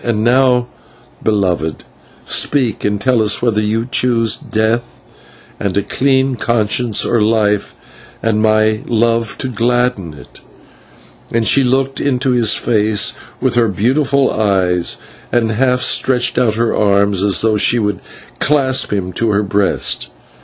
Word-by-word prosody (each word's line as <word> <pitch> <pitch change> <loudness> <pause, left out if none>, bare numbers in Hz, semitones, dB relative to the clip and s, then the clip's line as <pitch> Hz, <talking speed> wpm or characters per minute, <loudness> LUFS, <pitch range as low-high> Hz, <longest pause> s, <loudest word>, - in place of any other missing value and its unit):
"And 110 -3 -1
now, 125 0 +3 0.6
beloved, 90 -7 -1 0.4
speak 130 -7 -1
and 105 0 -1
tell 125 +1 +1
us 105 - +1
whether 110 -3 +1
you 110 +2 -1
choose 120 -3 +1
death 110 +2 -2 0.6
and 100 -1 -2
a 100 - +1
clean 130 +3 0
conscience, 115 0 0
or 120 -2 +1
life 105 -2 0 0.5
and 110 -1 +1
my 110 0 +2
love 115 -1 0
to - - -3
gladden 120 -7 -1
it" 70 - -16 0.9
and 115 -1 0
she 140 - +4
looked 135 +2 0
into 135 -1 0
his 120 -4 +2
face 110 -2 +1 0.3
with 130 -1 0
her 120 -1 +3
beautiful 135 - +1
eyes, 95 -5 0 0.3
and 115 -2 +1
half 125 +2 +1
stretched 125 -1 +1
out 115 -4 +1
her 115 0 0
arms 100 -2 +1
as 100 -1 +2
though 110 -1 +1
she 115 +3 +2
would 105 -3 -1 0.4
clasp 135 -2 +1
him 95 -3 -3
to 115 +4 -1
her 105 0 +1
breast. 100 -10 -1
115 Hz, 140 wpm, -15 LUFS, 105-125 Hz, 0.9 s, she